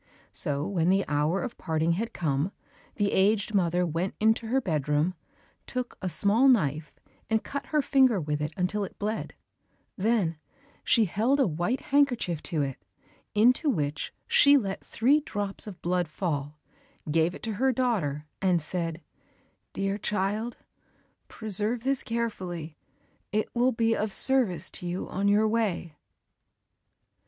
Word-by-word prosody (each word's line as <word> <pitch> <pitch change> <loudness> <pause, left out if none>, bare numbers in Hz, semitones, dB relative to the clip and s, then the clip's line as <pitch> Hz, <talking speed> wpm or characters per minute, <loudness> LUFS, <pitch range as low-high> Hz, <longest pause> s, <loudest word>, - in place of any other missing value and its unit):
So 145 +1 -1
when 175 -3 0
the 195 +1 +3
hour 150 +6 0
of 245 -2 -6
parting 160 -1 0
had 220 +7 -2
come, 150 +1 -1 0.4
the 205 -1 0
aged 205 +2 +2
mother 180 -2 +2
went 170 +3 -2
into 220 +1 +2
her 260 +4 +2
bedroom, 155 - 0 0.5
took 250 -1 -4
a 185 - -2
small 205 - +5
knife 155 - +2 0.4
and 220 -1 +1
cut 280 - -5
her 300 -2 +1
finger 260 -7 +4
with 150 -2 -2
it 150 0 -2
until 195 +3 0
it 195 - -8
bled, 215 +2 -3 0.6
then 190 -6 0 0.4
she 230 -3 +4
held 230 +9 +1
a 270 - +4
white 175 - -1
handkerchief 245 - +1
to 155 -4 -1
it 135 -2 -4 0.6
into 250 +8 +4
which 150 - -2
she 285 0 +6
let 195 -7 -3
three 270 +7 +2
drops 205 -7 +1
of 185 -5 -10
blood 175 0 0
fall, 150 -3 -3 0.5
gave 165 +3 +2
it - - -12
to 225 - -2
her 265 0 +4
daughter 195 - -1 0.2
and 185 -3 +3
said, 165 0 -3 0.7
"Dear 195 +1 -2
child, 210 +4 -2 0.7
preserve 220 +2 -3
this 270 0 0
carefully, 185 -9 -4 0.6
it 215 +1 -1
will 245 +2 +3
be 225 -1 +1
of 215 0 -2
service 255 -10 +3
to 180 - -3
you 175 +2 -3
on 200 +2 -1
your 210 +2 +4
way." 210 -8 -1
195 Hz, 145 wpm, -27 LUFS, 165-230 Hz, 0.7 s, she